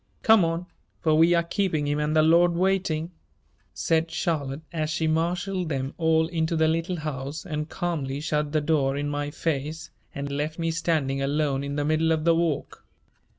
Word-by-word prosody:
Come 220 Hz, -4 st, +6 dB
on, 165 Hz, +1 st, -1 dB, 0.3 s
for 155 Hz, -, +2 dB
we 165 Hz, +3 st, +5 dB
are 170 Hz, -, +3 dB
keeping 170 Hz, -4 st, -1 dB
him 145 Hz, +1 st, 0 dB
and 150 Hz, +1 st, 0 dB
the 155 Hz, -, +5 dB
Lord 170 Hz, +2 st, +5 dB
waiting," 180 Hz, -3 st, 0 dB, 0.6 s
said 160 Hz, -, 0 dB
Charlotte 155 Hz, -4 st, -2 dB
as 155 Hz, -2 st, -1 dB
she 160 Hz, +1 st, -1 dB
marshaled 175 Hz, +3 st, 0 dB
them 135 Hz, -1 st, -2 dB
all 160 Hz, -1 st, +3 dB
into 160 Hz, 0 st, -1 dB
the 160 Hz, 0 st, +3 dB
Little 165 Hz, +3 st, 0 dB
House 145 Hz, +2 st, -5 dB
and 150 Hz, -3 st, -4 dB
calmly 150 Hz, -7 st, -3 dB
shut 150 Hz, -1 st, -1 dB
the 155 Hz, 0 st, +1 dB
door 145 Hz, -3 st, +1 dB
in 145 Hz, 0 st, -2 dB
my 145 Hz, 0 st, -2 dB
face 155 Hz, 0 st, -3 dB, 0.2 s
and 140 Hz, 0 st, -4 dB
left 150 Hz, +2 st, -2 dB
me 165 Hz, -1 st, -1 dB
standing 155 Hz, -5 st, 0 dB
alone 140 Hz, -1 st, 0 dB
in 140 Hz, 0 st, -4 dB
the 145 Hz, 0 st, -1 dB
middle 155 Hz, +1 st, +2 dB
of 160 Hz, -1 st, +1 dB
the 165 Hz, 0 st, +4 dB
walk. 165 Hz, -3 st, -1 dB
160 Hz, 185 wpm, -26 LUFS, 145-165 Hz, 0.6 s, Come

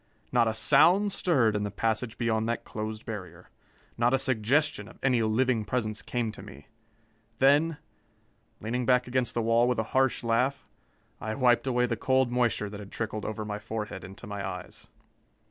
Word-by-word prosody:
Not 120 Hz, -2 st, +3 dB
a 110 Hz, -, -1 dB
sound 200 Hz, -, +4 dB
stirred 130 Hz, -, +2 dB
in 105 Hz, -, 0 dB
the 105 Hz, -, -2 dB
passage 110 Hz, +2 st, -2 dB
beyond 110 Hz, -1 st, 0 dB
that 115 Hz, -, -2 dB
closed 110 Hz, 0 st, -6 dB
barrier. 105 Hz, -5 st, -8 dB, 0.5 s
Not 120 Hz, +2 st, +3 dB
a -, -, +3 dB
suggestion 130 Hz, -1 st, +1 dB
of 110 Hz, -, -14 dB
any 125 Hz, -3 st, +3 dB
living 115 Hz, +1 st, +1 dB
presence 110 Hz, -1 st, -2 dB
came 120 Hz, -3 st, -2 dB
to -, -, -11 dB
me. 70 Hz, +2 st, -12 dB, 0.7 s
Then, 145 Hz, +5 st, +4 dB, 0.8 s
leaning 120 Hz, +2 st, -2 dB
back 125 Hz, -1 st, +4 dB
against 125 Hz, 0 st, -1 dB
the 115 Hz, -, 0 dB
wall 115 Hz, +1 st, +3 dB
with 125 Hz, -, +1 dB
a 110 Hz, -, +1 dB
harsh 130 Hz, -2 st, +2 dB
laugh, 125 Hz, +4 st, 0 dB, 0.5 s
I 110 Hz, 0 st, -4 dB
wiped 125 Hz, -1 st, +3 dB
away 125 Hz, -1 st, +2 dB
the 115 Hz, -2 st, -2 dB
cold 130 Hz, 0 st, +2 dB
moisture 120 Hz, -4 st, +1 dB
that 100 Hz, 0 st, -8 dB
had 100 Hz, -1 st, -10 dB
trickled 110 Hz, -2 st, -4 dB
over 110 Hz, 0 st, -4 dB
my 105 Hz, 0 st, -4 dB
forehead 105 Hz, -2 st, -5 dB
into 95 Hz, +5 st, -10 dB
my 100 Hz, -2 st, -5 dB
eyes. 90 Hz, 0 st, -7 dB
115 Hz, 180 wpm, -28 LUFS, 110-125 Hz, 0.8 s, sound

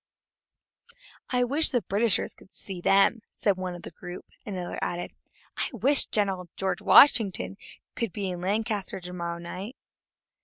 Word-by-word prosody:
"I 250 Hz, -1 st, +2 dB
wish 285 Hz, +6 st, +2 dB
the 245 Hz, -4 st, +1 dB
Britishers 205 Hz, +3 st, +1 dB
could 190 Hz, -, -20 dB
see 190 Hz, -3 st, -6 dB
them!" 195 Hz, +5 st, +4 dB, 0.2 s
said 200 Hz, -2 st, +1 dB
one 185 Hz, -1 st, -4 dB
of 175 Hz, -, -11 dB
the -, -, -8 dB
group; 175 Hz, +2 st, -9 dB, 0.2 s
and 205 Hz, -, -4 dB
another 180 Hz, -1 st, -4 dB
added: 175 Hz, 0 st, -3 dB, 0.5 s
"I -, -, -1 dB
wish 265 Hz, +5 st, +3 dB
General 190 Hz, -4 st, -1 dB
Washington 195 Hz, +2 st, +5 dB, 0.4 s
could 230 Hz, -4 st, -2 dB
be 195 Hz, -1 st, -3 dB
in 175 Hz, -1 st, -6 dB
Lancaster 205 Hz, 0 st, -1 dB
to 180 Hz, 0 st, -9 dB
morrow 170 Hz, -1 st, -4 dB
night!" 185 Hz, +8 st, -7 dB
195 Hz, 150 wpm, -27 LUFS, 180-225 Hz, 0.5 s, Washington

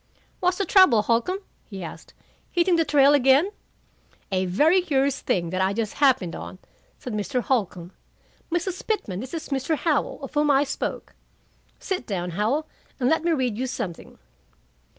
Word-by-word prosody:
"What's 360 Hz, 0 st, +1 dB
the 395 Hz, -, 0 dB
trouble, 350 Hz, -, +5 dB
Holcombe?" 240 Hz, -, 0 dB, 0.3 s
he 195 Hz, -4 st, -7 dB
asked. 165 Hz, -, -10 dB, 0.3 s
"Hitting 350 Hz, 0 st, +2 dB
the 330 Hz, -, +3 dB
trail 290 Hz, -2 st, +5 dB
again?" 280 Hz, +7 st, +4 dB, 0.8 s
"A 185 Hz, -1 st, 0 dB
very 310 Hz, -, +4 dB
curious 275 Hz, -5 st, 0 dB
thing 170 Hz, -3 st, -1 dB
that 185 Hz, 0 st, -1 dB
I 190 Hz, +1 st, +1 dB
just 220 Hz, 0 st, -2 dB
happened 260 Hz, -11 st, +3 dB
on," -, -, -8 dB, 0.4 s
said 250 Hz, -, -7 dB
Mr. 215 Hz, +5 st, -1 dB
Holcombe. 190 Hz, -8 st, -1 dB, 0.6 s
"Mrs. 350 Hz, +2 st, -3 dB
Pitman, 210 Hz, -, -2 dB
this 260 Hz, +8 st, -6 dB
is 320 Hz, -, -6 dB
Mr. 280 Hz, +3 st, -1 dB
Howell, 310 Hz, -2 st, 0 dB
of 275 Hz, -, -7 dB
whom 295 Hz, 0 st, +2 dB
I 280 Hz, 0 st, +4 dB
spoke. 275 Hz, -, -4 dB, 0.6 s
Sit 370 Hz, -9 st, -4 dB
down, 180 Hz, -3 st, -3 dB
Howell, 220 Hz, -, 0 dB, 0.3 s
and 250 Hz, -1 st, +2 dB
let 320 Hz, 0 st, +2 dB
me 340 Hz, -, +1 dB
read 255 Hz, -8 st, 0 dB
you 260 Hz, -, -1 dB
something." 180 Hz, -9 st, -6 dB
270 Hz, 165 wpm, -24 LUFS, 210-320 Hz, 0.8 s, trouble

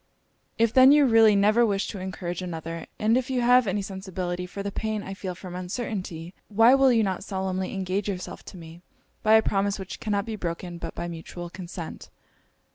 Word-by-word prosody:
'If 230 Hz, 0 st, +2 dB
then 260 Hz, +1 st, +8 dB
you 295 Hz, -1 st, +6 dB
really 225 Hz, -3 st, +6 dB
never 210 Hz, +4 st, +4 dB
wish 200 Hz, -3 st, +1 dB
to 200 Hz, -, -6 dB
encourage 180 Hz, -1 st, -5 dB
another, 165 Hz, -2 st, -6 dB
and 220 Hz, +2 st, +2 dB
if 255 Hz, +1 st, 0 dB
you 255 Hz, -2 st, 0 dB
have 245 Hz, -1 st, +5 dB
any 195 Hz, +1 st, -1 dB
sensibility 185 Hz, -2 st, -4 dB
for 200 Hz, +2 st, -6 dB
the 200 Hz, -, -3 dB
pain 215 Hz, 0 st, -3 dB
I 195 Hz, -, -6 dB
feel 190 Hz, -2 st, -5 dB
from 180 Hz, 0 st, -9 dB
uncertainty, 180 Hz, -3 st, -5 dB
why 225 Hz, +4 st, +5 dB
will 270 Hz, -1 st, +5 dB
you 230 Hz, -2 st, +3 dB
not 190 Hz, -2 st, -2 dB
solemnly 190 Hz, -1 st, -3 dB
engage 195 Hz, +1 st, -2 dB
yourself 185 Hz, -2 st, -5 dB
to 190 Hz, -, -10 dB
me, 165 Hz, 0 st, -12 dB, 0.4 s
by 215 Hz, -, +4 dB
a 220 Hz, -, +5 dB
promise 200 Hz, 0 st, 0 dB
which 190 Hz, -2 st, -7 dB
cannot 205 Hz, -2 st, -1 dB
be 225 Hz, -1 st, -4 dB
broken 175 Hz, -2 st, -5 dB
but -, -, -6 dB
by 170 Hz, -, -4 dB
mutual 170 Hz, +1 st, -8 dB
consent?' 175 Hz, -3 st, -8 dB
195 Hz, 200 wpm, -26 LUFS, 180-220 Hz, 0.4 s, then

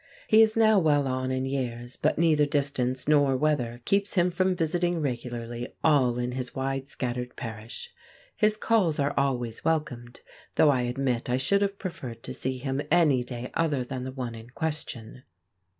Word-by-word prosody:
He 220 Hz, +1 st, +6 dB
is 220 Hz, 0 st, +4 dB
now 220 Hz, -2 st, +5 dB
well 145 Hz, -5 st, +3 dB
on 130 Hz, 0 st, -1 dB
in 130 Hz, 0 st, -1 dB
years, 125 Hz, -2 st, -3 dB
but -, -, 0 dB
neither 155 Hz, -3 st, +4 dB
distance 135 Hz, -3 st, -1 dB
nor 145 Hz, -3 st, +4 dB
weather 125 Hz, -5 st, 0 dB
keeps 200 Hz, +1 st, +1 dB
him 180 Hz, -1 st, +3 dB
from 185 Hz, +1 st, +1 dB
visiting 175 Hz, +1 st, 0 dB
regularly 120 Hz, -3 st, -4 dB
all 130 Hz, -6 st, +4 dB
in 125 Hz, 0 st, -1 dB
his 125 Hz, 0 st, -5 dB
wide 135 Hz, 0 st, -2 dB
scattered 125 Hz, -1 st, -4 dB
parish. 115 Hz, -, -7 dB, 0.4 s
His 215 Hz, -1 st, +2 dB
calls 200 Hz, -9 st, +2 dB
are 140 Hz, 0 st, +1 dB
always 125 Hz, -5 st, -1 dB
welcomed, 125 Hz, -7 st, -2 dB, 0.3 s
though 150 Hz, -, +6 dB
I 130 Hz, -3 st, +1 dB
admit 125 Hz, -2 st, -1 dB
I 125 Hz, -, +2 dB
should 200 Hz, +10 st, +2 dB
have 200 Hz, 0 st, 0 dB
preferred 125 Hz, -, -7 dB
to -, -, -6 dB
see 130 Hz, 0 st, -3 dB
him 135 Hz, +2 st, -2 dB
any 150 Hz, -7 st, +4 dB
day 125 Hz, 0 st, -6 dB
other 150 Hz, -6 st, +1 dB
than 125 Hz, 0 st, -5 dB
the 130 Hz, -, -5 dB
one 125 Hz, -3 st, -5 dB
in 115 Hz, +1 st, -11 dB
question. 130 Hz, -6 st, -5 dB
135 Hz, 175 wpm, -27 LUFS, 125-160 Hz, 0.4 s, He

